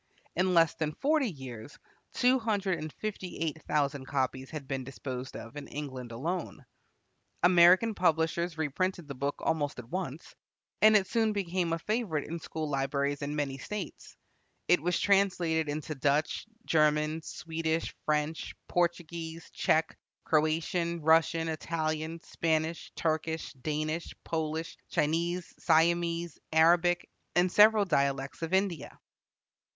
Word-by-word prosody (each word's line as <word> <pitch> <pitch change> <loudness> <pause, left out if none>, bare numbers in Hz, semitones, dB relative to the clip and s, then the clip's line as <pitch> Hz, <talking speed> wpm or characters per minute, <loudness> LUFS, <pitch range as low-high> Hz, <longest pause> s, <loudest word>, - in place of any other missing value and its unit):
In 185 +1 +2
less 165 -2 +5
than 155 -1 -3
forty 295 -3 +2
years 130 - -9 0.4
two 255 +1 +4
hundred 205 -5 0
and 155 0 -5
fifty 200 -2 -5
eight 160 -1 -2
thousand 140 -2 0
copies 130 -1 -1
have 150 -4 -7
been 135 -1 -2
disposed 130 +1 -6
of 115 +3 -10
in 145 -1 -7
England 130 -5 -6
alone. 155 +3 -4 0.8
American 180 +5 +6
publishers 165 -1 +1
reprinted 165 +2 -1
the 140 - -5
book 140 +2 -2
almost 145 -3 0
at 125 -2 -8
once, 175 -5 -4 0.5
and 215 0 +7
it 195 - +1
soon 225 0 +1
became 180 -3 -1
a 165 - +1
favorite 205 - -1
in 170 +1 -4
school 160 0 -4
libraries 140 0 -1
in 145 +1 -3
many 140 -2 -2
States. 210 +9 -7 0.5
It 180 -3 +4
was 180 +2 +1
translated 180 -6 +2
into 155 +1 -3
Dutch, 145 +7 0 0.2
German, 155 0 +2
Swedish, 160 0 -3
French, 150 +1 -1
Portuguese, 170 -1 -2
Czech, 160 +1 +1 0.3
Croatian, 165 +2 +1
Russian, 165 +1 +4
Italian, 160 0 -2
Spanish, 160 0 -1
Turkish, 160 0 -1
Danish, 155 +4 -3
Polish, 160 0 -3
Chinese, 170 +4 0
Siamese, 170 0 +2
Arabic, 170 +2 +4 0.3
and 180 +1 +3
several 210 0 +6
dialects 140 -4 0
of 165 0 -3
India. 190 -5 -1
160 Hz, 130 wpm, -30 LUFS, 150-175 Hz, 0.8 s, and